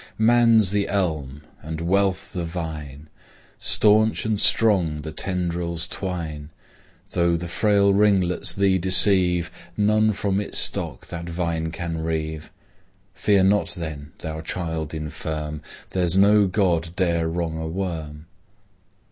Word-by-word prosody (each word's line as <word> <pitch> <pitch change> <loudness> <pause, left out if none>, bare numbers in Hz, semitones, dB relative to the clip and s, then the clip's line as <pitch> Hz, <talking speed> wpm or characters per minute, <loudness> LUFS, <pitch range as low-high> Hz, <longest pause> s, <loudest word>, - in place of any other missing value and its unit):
Man's 115 -3 +4
the 100 -1 0
elm, 75 -7 -2 0.2
and 80 +1 -6
Wealth 95 +3 0
the 90 -3 -3
vine, 80 -4 -6 0.5
Stanch 110 +1 +4
and 110 -2 0
strong 90 -9 +2
the 80 - -6
tendrils 85 -1 -2
twine: 80 -6 -5 0.6
Though 85 -1 +2
the 85 +1 -6
frail 100 +2 +2
ringlets 95 -3 +2
thee 95 -1 +2
deceive, 90 -1 +3 0.3
None 110 +1 +3
from 100 0 -1
its 105 - -3
stock - - -1
that 85 0 -6
vine 85 -1 -2
can 80 0 -4
reave. 80 -1 -3 0.6
Fear 100 0 +2
not, 100 +2 +2
then, 80 -3 -7
thou 80 0 -6
child 80 -2 -4
infirm, 75 0 -5 0.3
There's 90 -1 +1
no 100 +1 +5
god 90 -4 0
dare 85 -3 +1
wrong 80 -1 -3
a 80 - -4
worm. 80 -4 -5
85 Hz, 125 wpm, -23 LUFS, 80-100 Hz, 0.6 s, no